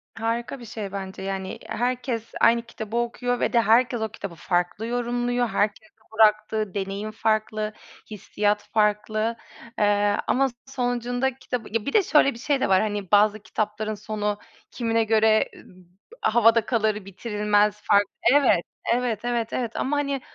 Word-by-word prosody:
Harika 230 +4 -3
bir 240 - -10
şey 215 -3 -6
bence. 190 -1 -6
Yani, 190 -1 -4
i - - -15
herkes 245 -1 -2
aynı 235 0 +5
kitabı 230 -1 -6
okuyor 245 +1 -1
ve - - 0
de 235 - +5
herkes 235 +2 +3
o 220 - -1
kitabı 200 -5 -8
farklı 175 +5 -1
yorumluyor. 245 0 0
Herkesin 215 +12 -1 0.2
bıraktığı 215 -2 +2
deneyim 200 +2 -4
farklı, 215 -1 -1 0.4
hissiyat 210 0 -1
farklı, 215 +1 +1 0.4
eee, 205 0 +3
ama 270 +1 +3 0.2
sonucunda 245 0 -1
kitabı 250 -3 -5
ya 230 -2 -1
bir 280 - -3
de 425 - +5
şöyle 300 -5 +4
bir 230 - -11
şey 285 0 0
de - - +1
var, 190 -1 +5
hani 205 -3 -3
bazı 210 +1 +4
kitapların 215 0 -3
sonu 210 0 -3 0.3
kimine 230 -2 0
göre 220 0 +3
m - - -15 0.6
havada 230 0 +4
kalır, 215 -4 0
bitirilmez, 210 +1 0
farklı 200 -1 +3 0.2
Evet, 275 -11 +4 0.3
evet, 240 -3 0
evet, 235 -2 -1
evet 235 -3 -2
ama 290 +2 0
hani 280 -2 -1
220 Hz, 155 wpm, -24 LUFS, 210-240 Hz, 0.6 s, aynı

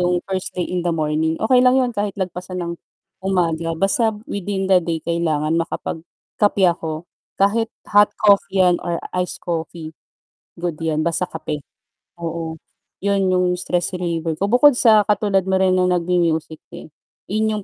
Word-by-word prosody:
yung 180 0 +1
first 190 -1 -4
thing 180 - 0
in 180 - 0
the 175 - -2
morning, 155 +1 0
okey 250 +6 +3
lang 250 +1 +5
'yun 250 -2 +1
kahit 205 -1 -3
lagpasan 180 -1 -4
ng 170 - -4 0.5
umaga 165 -4 0
basta 195 +5 +2 0.2
within 200 0 -3
the 190 -1 +4
day 165 -1 -2
kailangan 165 -1 0
makapag-kape 175 +4 -2
ako, 165 -2 0 0.3
kahit 220 +3 +2 0.2
hot 205 0 +5
coffee 200 -1 +3
'yan 175 -1 +3
or 170 -1 -2 0.2
iced 180 0 -2
coffee, 165 -1 -4 0.7
good 170 -2 -4
'yan, 155 -1 0
basta 180 +2 0
kape. 155 -2 -5 0.6
Oo, 165 -1 -5 0.4
'yun 195 -1 +1
'yung 180 -1 +2
stress 180 0 -2
reliever 165 -2 -2
ko, 200 +6 -2
bukod 280 +2 +6
sa 220 -4 +5
katulad 200 -2 +1
mo 190 - +2
rin 185 -1 +3
ng 180 - +3
nag-mu-music, 170 -3 0 0.2
eh, 155 - -11 0.4
'yun 220 +1 +1
'yong 210 - -5
180 Hz, 160 wpm, -20 LUFS, 165-200 Hz, 0.7 s, bukod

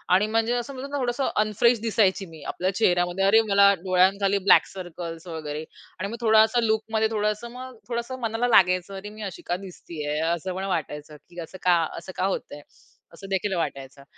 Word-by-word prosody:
आणि 200 +3 +3
म्हणजे 225 +2 +1
असं 245 +3 -3
म्हणतो 270 +2 -7
ना, 285 - -2
थोडंसं 250 +1 -1
अनफ्रेश 220 +3 +2
दिसायची 205 -3 +1
मी. 160 -3 -13
आपल्या 185 +2 -1
चेहऱ्यामध्ये 180 -2 +2
अरे! 220 +3 +6
मला 200 0 +6
डोळ्यांखाली 195 +2 +3
ब्लॅक - - +7
सर्कल्स 170 -2 -7
वगैरे 155 -2 -5 0.4
आणि 200 +2 -3
मग 230 - -6
थोडासा 220 +1 +4
लूकमध्ये, 220 0 0
थोडंसं 210 +2 -1
मग 255 0 -9
थोडंसं 240 +2 -4
मनाला 230 +1 0
लागायचं. 185 -3 +3
अरे, 195 +2 -7
मी 215 +1 -11
अशी - - -12
का 175 - -1
दिसतीये? 150 -4 -5
असं 170 +3 -1
मला 190 +1 -3
वाटायचं, 150 -4 -4
की 175 - -11
असं 170 +3 -9
का, 180 -1 +5 0.2
असं 175 +3 -8
का 185 - 0
होतंय? 150 -6 -4 0.5
असं 195 +4 -11
देखील 195 +1 -1
वाटायचं. 140 -4 -4
195 Hz, 180 wpm, -25 LUFS, 175-220 Hz, 0.5 s, ब्लॅक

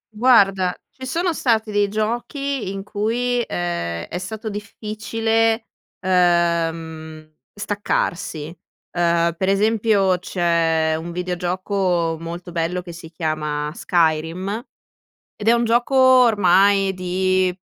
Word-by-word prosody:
Guarda, 195 -6 +4 0.2
ci 260 0 -9
sono 340 +6 0
stati 225 -7 0
dei 205 0 +2
giochi 240 +4 -2
in 195 0 -5
cui, 235 +4 -1
ehm, 85 - -3
è - - -6
stato 220 +4 -6
difficile, 225 +2 -1 0.3
ehm, 165 -3 0 0.2
staccarsi. 175 -6 -2 0.4
Ehm, 170 -1 +2
per 190 +2 -1
esempio 200 -2 +2
c'è 170 -4 +1
un 170 +1 -6
videogioco 180 -1 -1
molto 170 +2 -7
bello 170 +2 -2
che 175 - -9
si 165 -1 -10
chiama 155 -2 -3
Skyrim, 175 +6 0 0.7
ed 210 - -7
è 230 - +6
un 235 0 +2
gioco 240 +3 +1
ormai 205 -7 +5
di, 185 0 0
185 Hz, 110 wpm, -21 LUFS, 170-220 Hz, 0.7 s, è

